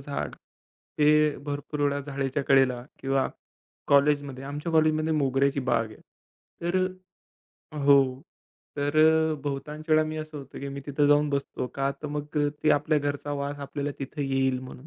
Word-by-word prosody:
झाड -, -, -4 dB, 0.7 s
हे 150 Hz, 0 st, +4 dB
भरपूर 145 Hz, +1 st, -4 dB
वेळा 145 Hz, 0 st, +1 dB
जाळीच्या 140 Hz, 0 st, -2 dB
कडेला 130 Hz, -3 st, +3 dB, 0.2 s
किंवा 135 Hz, 0 st, +1 dB, 0.6 s
कॉलेजमध्ये, 140 Hz, -2 st, +2 dB
आमच्या 145 Hz, +4 st, -4 dB
कॉलेजमध्ये 155 Hz, 0 st, +3 dB
मोगऱ्याची 140 Hz, -1 st, +1 dB
बाग 120 Hz, -3 st, +1 dB
आहे. -, -, -14 dB, 0.6 s
तर 175 Hz, +2 st, 0 dB, 1.0 s
अ -, -, -8 dB
हो, 135 Hz, -2 st, +5 dB, 0.6 s
तर 145 Hz, +1 st, -1 dB
अ, 160 Hz, 0 st, +5 dB
बहुतांश 150 Hz, +3 st, -5 dB
वेळा 155 Hz, 0 st, +5 dB
मी 155 Hz, 0 st, -4 dB
असं 155 Hz, -1 st, -6 dB
होतं 135 Hz, -1 st, -10 dB
की 140 Hz, -, -4 dB
मी 140 Hz, 0 st, -6 dB
तिथं 145 Hz, 0 st, +2 dB
जाऊन 145 Hz, 0 st, +4 dB
बसतो, 140 Hz, -2 st, -2 dB
का 135 Hz, 0 st, 0 dB
तर -, -, -3 dB
मग 150 Hz, +1 st, -4 dB
अ, 145 Hz, 0 st, +3 dB
ते 155 Hz, -, +4 dB
आपल्या 150 Hz, +1 st, +3 dB
घरचा 145 Hz, 0 st, -3 dB
वास 145 Hz, 0 st, -3 dB
आपल्याला 145 Hz, +1 st, -4 dB
तिथं 140 Hz, +2 st, -4 dB
येईल 135 Hz, -1 st, +1 dB
म्हणून. 130 Hz, +1 st, -11 dB
145 Hz, 160 wpm, -27 LUFS, 135-150 Hz, 1.0 s, हो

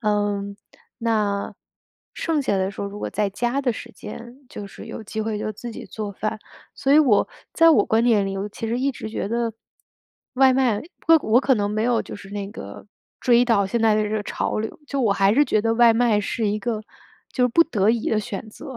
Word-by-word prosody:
嗯。 205 Hz, -2 st, -1 dB, 0.4 s
那 210 Hz, -4 st, -1 dB, 0.6 s
剩 315 Hz, -3 st, -1 dB
下 205 Hz, -6 st, 0 dB
的 190 Hz, +1 st, 0 dB
时 -, -, -9 dB
候 200 Hz, -, -3 dB
如 205 Hz, +1 st, -9 dB
果 -, -, -3 dB
在 205 Hz, -2 st, -1 dB
家 240 Hz, +7 st, -1 dB
的 250 Hz, -, +1 dB
时 235 Hz, +1 st, -9 dB
间 240 Hz, +2 st, -10 dB
就 210 Hz, -9 st, -8 dB
是 195 Hz, -, -11 dB
有 -, -, -7 dB
机 220 Hz, +1 st, -4 dB
会 215 Hz, -1 st, -2 dB
就 215 Hz, -, -3 dB
自 235 Hz, +3 st, -8 dB
己 -, -, -9 dB
做 210 Hz, -2 st, -6 dB
饭。 215 Hz, +2 st, -3 dB, 0.4 s
所 275 Hz, -, +1 dB
以 300 Hz, -, +7 dB
我 245 Hz, -9 st, +4 dB, 0.3 s
在 330 Hz, 0 st, +6 dB
我 240 Hz, -10 st, +5 dB
观 225 Hz, +2 st, +2 dB
念 210 Hz, -5 st, +3 dB
里， 195 Hz, 0 st, -3 dB
我 200 Hz, +2 st, -3 dB
其 225 Hz, -, -6 dB
实 235 Hz, +2 st, -1 dB
一 275 Hz, +2 st, +1 dB
直 220 Hz, -, -7 dB
觉 215 Hz, -, -3 dB
得 230 Hz, 0 st, -1 dB, 0.8 s
外 265 Hz, 0 st, +5 dB
卖 255 Hz, -4 st, +2 dB
因 -, -, -7 dB, 0.3 s
为 330 Hz, -, +9 dB
我 230 Hz, +4 st, +4 dB
可 265 Hz, -2 st, +3 dB
能 205 Hz, -1 st, -1 dB
没 215 Hz, +1 st, -1 dB
有 240 Hz, -1 st, +2 dB
就 -, -, -9 dB
是 200 Hz, -1 st, -12 dB
那 200 Hz, -1 st, -5 dB
个 220 Hz, -, -9 dB, 0.4 s
追 245 Hz, -1 st, +4 dB
到 225 Hz, -5 st, +3 dB
现 230 Hz, +4 st, -1 dB
在 220 Hz, -1 st, +4 dB
的 215 Hz, -, +2 dB
这 210 Hz, -, -3 dB
个 215 Hz, -1 st, -1 dB
潮 -, -, -2 dB
流， 220 Hz, -, -4 dB
就 280 Hz, -, -1 dB
我 220 Hz, -6 st, +3 dB
还 195 Hz, +1 st, +3 dB
是 290 Hz, -, +5 dB
觉 215 Hz, -6 st, +1 dB
得 225 Hz, -, +1 dB
外 235 Hz, -1 st, +6 dB
卖 225 Hz, -3 st, +3 dB
是 215 Hz, +2 st, -2 dB
一 210 Hz, +1 st, -1 dB
个 220 Hz, -2 st, -3 dB, 0.5 s
就 255 Hz, -, 0 dB
是 250 Hz, -, +3 dB
不 335 Hz, +8 st, +5 dB
得 210 Hz, -9 st, 0 dB
已 230 Hz, -1 st, -1 dB
的 220 Hz, -, +2 dB
选 205 Hz, +2 st, -6 dB
择。 255 Hz, +3 st, -9 dB
220 Hz, 255 characters per minute, -23 LUFS, 205-240 Hz, 0.8 s, 为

